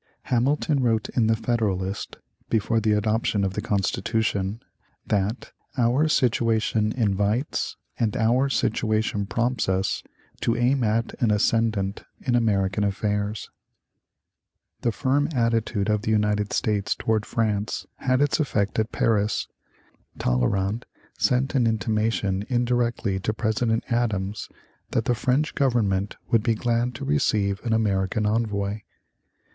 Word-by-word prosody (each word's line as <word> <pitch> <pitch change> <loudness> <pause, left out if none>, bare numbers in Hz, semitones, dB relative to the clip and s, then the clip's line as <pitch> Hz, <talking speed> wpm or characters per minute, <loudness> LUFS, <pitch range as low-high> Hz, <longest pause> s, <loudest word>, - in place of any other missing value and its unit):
Hamilton 140 +3 +2
wrote 115 -3 +1
in 115 -3 +1
"The 110 - +3
Federalist," 105 -4 -2 0.3
before 115 0 +1
the 110 -1 +2
adoption 105 0 +1
of 95 -1 -1
the 105 - -2
Constitution, 100 0 -1 0.5
that 105 +3 -1 0.3
"our 125 +5 +3
situation 115 -5 +2
invites 105 +3 0 0.2
and 110 0 0
our 125 +4 +2
situation 110 -4 0
prompts 120 0 0
us 95 +1 0 0.4
to 115 0 0
aim 125 +2 +2
at 115 +1 0
an 120 - +3
ascendant 105 -2 +1 0.2
in 125 - -1
American 105 -4 +1
affairs." 105 +1 -2 1.3
The 120 - +1
firm 140 +6 +1
attitude 115 -4 +1
of 105 -1 +1
the 110 - -3
United 105 -1 +1
States 105 -2 0
towards 110 -1 -1
France 105 -2 -1
had 130 0 +1
its 145 +1 +2
effect 110 -9 0
at 110 +2 0
Paris. 105 -2 +1 0.7
Talleyrand 95 - 0 0.3
sent 130 +2 +2
an 125 -4 +3
intimation 110 -2 0
indirectly 120 -5 0
to 105 +3 -1
President 110 +1 0
Adams 110 -4 -1 0.4
that 115 - 0
the 125 - +2
French 130 +6 0
government 105 -7 +1 0.2
would 115 -3 +4
be 115 0 +1
glad 120 +2 0
to 135 +4 -5
receive 105 -9 +1
an 120 - -2
American 105 -1 +1
envoy. 105 -2 0
110 Hz, 125 wpm, -25 LUFS, 105-120 Hz, 1.3 s, would